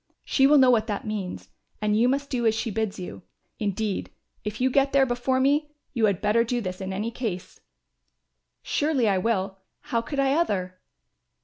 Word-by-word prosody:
She 270 Hz, -1 st, +4 dB
will 295 Hz, +1 st, +6 dB
know 260 Hz, -2 st, +6 dB
what 220 Hz, -2 st, +2 dB
that 205 Hz, -2 st, -3 dB
means 205 Hz, -4 st, -5 dB, 0.3 s
and 210 Hz, 0 st, +1 dB
you 235 Hz, +3 st, +4 dB
must 280 Hz, +1 st, -1 dB
do 240 Hz, -3 st, +1 dB
as 220 Hz, -, +3 dB
she 225 Hz, 0 st, -2 dB
bids 220 Hz, -1 st, -2 dB
you. 180 Hz, -1 st, -7 dB, 0.4 s
Indeed, 205 Hz, -1 st, -2 dB, 0.3 s
if 210 Hz, +1 st, -4 dB
you 260 Hz, +1 st, +2 dB
get 275 Hz, +1 st, +2 dB
there 275 Hz, -1 st, +5 dB
before 245 Hz, +1 st, 0 dB
me, 295 Hz, +3 st, +1 dB, 0.2 s
you 230 Hz, -4 st, +2 dB
had 200 Hz, -4 st, 0 dB
better 215 Hz, +3 st, +3 dB
do 240 Hz, +1 st, -1 dB
this 185 Hz, -3 st, -5 dB
in 190 Hz, 0 st, -4 dB
any 210 Hz, +5 st, -2 dB
case." 215 Hz, -7 st, -5 dB, 1.0 s
"Surely 290 Hz, -6 st, +1 dB
I 195 Hz, -2 st, +2 dB
will; 195 Hz, -2 st, -1 dB, 0.2 s
how 230 Hz, -, -1 dB
could 275 Hz, +4 st, -4 dB
I 275 Hz, 0 st, +3 dB
other?" 185 Hz, -, -1 dB
230 Hz, 190 wpm, -25 LUFS, 205-265 Hz, 1.0 s, will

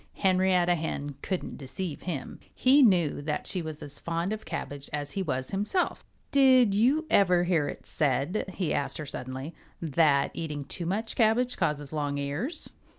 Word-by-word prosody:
Henrietta 185 Hz, -2 st, +3 dB
Hen 150 Hz, -3 st, -3 dB
couldn't 185 Hz, -2 st, -4 dB
deceive 145 Hz, +4 st, -5 dB
him. 165 Hz, -7 st, -5 dB, 0.2 s
He 270 Hz, +3 st, +5 dB
knew 180 Hz, -, +4 dB
that 150 Hz, +1 st, -2 dB
she 185 Hz, -, -1 dB
was 155 Hz, -2 st, -6 dB
as 145 Hz, -, -8 dB
fond 170 Hz, +4 st, -2 dB
of 215 Hz, -, -6 dB
cabbage 145 Hz, -1 st, -5 dB
as 145 Hz, -1 st, -3 dB
he 195 Hz, -, -2 dB
was 130 Hz, -7 st, -2 dB
himself. 210 Hz, -, -1 dB, 0.3 s
"Did 260 Hz, -6 st, +6 dB
you 260 Hz, -, +3 dB
ever 180 Hz, -3 st, +5 dB
hear 170 Hz, -5 st, +1 dB
it -, -, -7 dB
said," 150 Hz, +8 st, 0 dB
he 180 Hz, -5 st, -1 dB
asked 140 Hz, -, -1 dB
her 155 Hz, -, -5 dB
suddenly, 130 Hz, +3 st, -6 dB, 0.3 s
"that 150 Hz, -3 st, +3 dB
eating 150 Hz, -3 st, -4 dB
too 170 Hz, +3 st, -4 dB
much 215 Hz, +5 st, -2 dB
cabbage 245 Hz, +2 st, +3 dB
causes 145 Hz, -1 st, -1 dB
long 145 Hz, -2 st, -1 dB
ears?" 145 Hz, -, -3 dB
170 Hz, 165 wpm, -28 LUFS, 145-200 Hz, 0.3 s, Did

